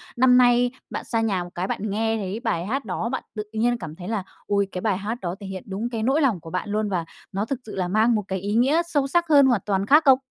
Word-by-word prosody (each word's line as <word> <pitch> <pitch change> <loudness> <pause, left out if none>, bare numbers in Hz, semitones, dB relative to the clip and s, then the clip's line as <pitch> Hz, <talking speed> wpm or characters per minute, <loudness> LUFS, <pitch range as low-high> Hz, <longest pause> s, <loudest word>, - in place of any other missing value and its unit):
năm 250 0 +5
nay 245 0 +4 0.2
bạn - - -4
xa 230 -2 0
nhà 200 -5 0
một 175 - -9
cái, 180 +2 -2
bạn 210 +2 -3
nghe 225 +2 0
thấy 200 +1 -4
bài 170 -7 -1
hát 270 +7 -2
đó, 230 - -2
bạn 260 - -3
tự 210 - -3
nhiên 240 +2 +1
cảm 160 -7 -8
thấy 180 +1 -9
là 215 -3 -2 0.2
ôi, 200 -1 +1
cái 180 - -4
bài 205 -3 +1
hát 210 +4 -3
đó 175 -1 -3
thể 200 - -8
hiện 190 -1 -6
đúng 205 +5 -3
cái 225 -2 -3
nỗi 270 +6 +2
lòng 245 - +2
của 165 0 -10
bạn 185 +3 -3
luôn 210 0 0
và 175 -4 -1 0.3
nó 200 +2 -1
thực 260 +2 -3
sự 215 - -8
là 185 -2 -1
mang 220 +5 +3
một 210 - 0
cái 190 -1 -2
ý 200 +3 -3
nghĩa 270 +8 +4
sâu 290 -5 0
sắc 345 +4 +2
hơn, 285 -3 +7
hoàn 240 -6 +3
toàn 195 -1 0
khác 300 +7 +6
không? 265 -2 +6
215 Hz, 290 wpm, -24 LUFS, 195-245 Hz, 0.3 s, hơn